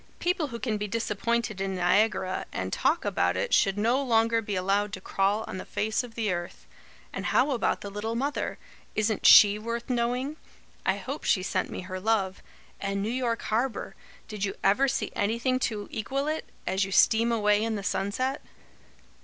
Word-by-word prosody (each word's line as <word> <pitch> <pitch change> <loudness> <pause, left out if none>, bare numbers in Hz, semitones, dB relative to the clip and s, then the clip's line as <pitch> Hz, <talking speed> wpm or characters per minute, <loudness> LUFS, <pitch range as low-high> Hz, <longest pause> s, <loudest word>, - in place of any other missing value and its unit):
People 350 -3 0
who 235 -3 -6
can 225 -3 -2
be 210 - -2
disappointed 225 0 -1
in 195 -1 -2
Niagara, 185 +1 +1
and 95 +1 -4
talk - - +1
about 90 +1 +1
it, - - -1
should 195 0 +3
no 235 +6 +2
longer 230 -3 +2
be 205 -2 -4
allowed 195 +2 0
to - - -4
crawl 195 +3 0
on 185 - -5
the - - -5
face 220 +3 -1
of 235 -2 -11
the 220 -4 0
earth. 175 0 -6 0.5
And - - -3
how 275 +3 +3
about 245 - 0
the 200 - -6
'Little 215 +3 -3
Mother'? 280 +4 -2 0.4
Isn't 215 0 +1
she 205 0 +8
worth 235 +3 -4
knowing? 250 +5 -1 0.5
I - - +2
hope - - -6
she 185 - +2
sent 185 0 -1
me - - -5
her 185 0 -6
love. 195 -2 0 0.4
And 195 0 -2
New 215 - -1
York 245 -2 -1
harbour! 235 +3 -1 0.3
Did 210 -2 -5
you 195 - -1
ever 220 +8 +4
see 255 - -1
anything 235 +5 0
to 210 -2 -6
equal 270 +6 -2
it, 310 +1 -2 0.2
as 190 +1 +1
you 195 - -4
steam 230 +4 +4
away 210 -2 +2
in 225 -1 -1
the 200 - -4
sunset?" 255 +9 -1
215 Hz, 185 wpm, -27 LUFS, 195-235 Hz, 0.5 s, she